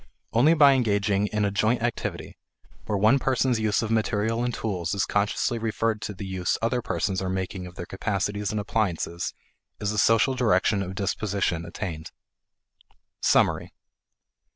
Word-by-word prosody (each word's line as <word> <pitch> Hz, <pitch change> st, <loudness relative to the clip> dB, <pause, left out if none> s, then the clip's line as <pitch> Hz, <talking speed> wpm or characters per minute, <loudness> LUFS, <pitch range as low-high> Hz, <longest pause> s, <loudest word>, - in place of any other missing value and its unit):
Only 140 Hz, +9 st, +5 dB
by 145 Hz, -3 st, +7 dB
engaging 105 Hz, -5 st, +1 dB
in 105 Hz, 0 st, 0 dB
a 100 Hz, -, 0 dB
joint 110 Hz, +4 st, +1 dB
activity, 120 Hz, -1 st, -3 dB, 0.5 s
where 105 Hz, -, 0 dB
one 110 Hz, +7 st, +4 dB
person's 130 Hz, -2 st, +1 dB
use 110 Hz, 0 st, +1 dB
of 110 Hz, -, -3 dB
material 110 Hz, +1 st, 0 dB
and 125 Hz, -, 0 dB
tools 95 Hz, -6 st, -3 dB
is 100 Hz, -, +1 dB
consciously 105 Hz, +3 st, 0 dB
referred 110 Hz, 0 st, -1 dB
to 105 Hz, -, -5 dB
the 95 Hz, -, -7 dB
use 95 Hz, -2 st, -1 dB
other 120 Hz, +2 st, 0 dB
persons 95 Hz, -4 st, -1 dB
are 95 Hz, -, -2 dB
making 95 Hz, 0 st, -3 dB
of 90 Hz, -, -13 dB
their 90 Hz, -, -6 dB
capacities 100 Hz, +1 st, -2 dB
and 110 Hz, -, -2 dB
appliances, 95 Hz, -5 st, -2 dB, 0.4 s
is 105 Hz, 0 st, -1 dB
a 105 Hz, -, -1 dB
social 115 Hz, +5 st, +4 dB
direction 105 Hz, -4 st, +2 dB
of 95 Hz, 0 st, -5 dB
disposition 95 Hz, -4 st, -1 dB
attained. 85 Hz, -3 st, -6 dB, 1.1 s
Summary. -, -, +2 dB
105 Hz, 155 wpm, -26 LUFS, 95-115 Hz, 1.1 s, by